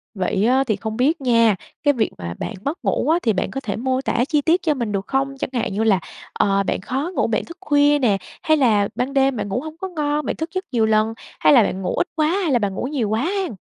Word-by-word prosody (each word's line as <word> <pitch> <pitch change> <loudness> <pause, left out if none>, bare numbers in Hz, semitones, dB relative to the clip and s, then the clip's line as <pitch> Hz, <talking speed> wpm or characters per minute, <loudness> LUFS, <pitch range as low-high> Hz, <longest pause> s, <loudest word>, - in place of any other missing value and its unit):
Vậy 190 +1 0
á, 260 +3 +3
thì 220 -5 0
không 220 +2 -5
biết 285 +5 +2
nha, 230 -4 +4 0.3
cái 290 - +4
việc 230 -5 0
mà 85 -1 -5
bạn - - -4
mất 290 +5 -2
ngủ - - 0
á, 330 +2 +4
thì 225 - +2
bạn 185 - -2
có 270 - -4
thể 210 -7 -3
mô 260 +2 -1
tả 245 -2 0
chi 300 -2 +2
tiết 330 +5 +2
cho 315 - +1
mình 235 -6 -3
được 195 -1 -3
không? 270 0 -1
Chẳng - - -3
hạn 235 -5 -1
như 210 +3 0
là, 205 -4 +3 0.3
ờ, 195 0 +2
bạn 190 - -2
khó 270 - -3
ngủ, - - +1
bạn 225 - -1
thức 335 - -11
khuya 290 -3 +3
nè, 220 -7 +2 0.3
hay 315 0 +3
là 215 -7 +3
ban 260 +2 -2
đêm 270 -1 +3
bạn 210 - -3
ngủ 240 +6 -1
hông 315 +1 -8
có 380 - -4
ngon, 300 -4 -2
bạn - - -2
thức 320 +1 -4
giấc 375 0 -3
nhiều 230 -4 +2
lần, 220 0 +2 0.3
hay - - +5
là 245 -5 +7
bạn 190 -1 -2
ngủ 185 - -2
ít - - 0
quá 310 -1 +2
hay 355 -1 0
là 245 - +3
bạn 205 -3 -1
ngủ - - -3
nhiều 260 -7 -1
quá 220 +2 0
hen? 375 - -2
255 Hz, 280 wpm, -21 LUFS, 215-295 Hz, 0.3 s, là